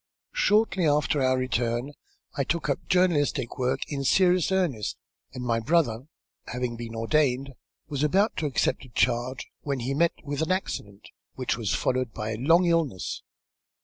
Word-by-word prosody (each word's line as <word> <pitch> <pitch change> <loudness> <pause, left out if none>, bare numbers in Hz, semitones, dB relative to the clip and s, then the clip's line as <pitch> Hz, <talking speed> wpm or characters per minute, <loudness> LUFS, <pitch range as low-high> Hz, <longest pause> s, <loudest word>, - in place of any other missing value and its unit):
"Shortly 210 - +3
after 145 0 +2
our 130 0 +3
return 125 +1 -1 0.4
I 140 - +1
took 160 +3 -2
up 140 - +1
journalistic 150 -9 +1
work 125 0 0
in 140 -2 -3
serious 180 +4 +3
earnest, 165 - 0 0.3
and 125 - -6
my 115 -2 +1
brother, 130 -2 +1 0.4
having 125 0 -3
been 115 -1 -7
ordained, 135 +2 +1 0.3
was 140 -2 -3
about 195 +8 +2
to 155 - 0
accept 140 - 0
a 130 - -13
charge 120 +2 0 0.2
when 140 -3 -2
he 130 +3 -1
met 170 +4 +2
with 145 -1 -3
an 160 - 0
accident 105 - -3 0.3
which 130 -1 -1
was 110 -4 -1
followed 130 -3 -1
by 110 -1 -3
a 110 - -3
long 165 +9 +4
illness. 160 - 0
135 Hz, 160 wpm, -26 LUFS, 120-165 Hz, 0.4 s, long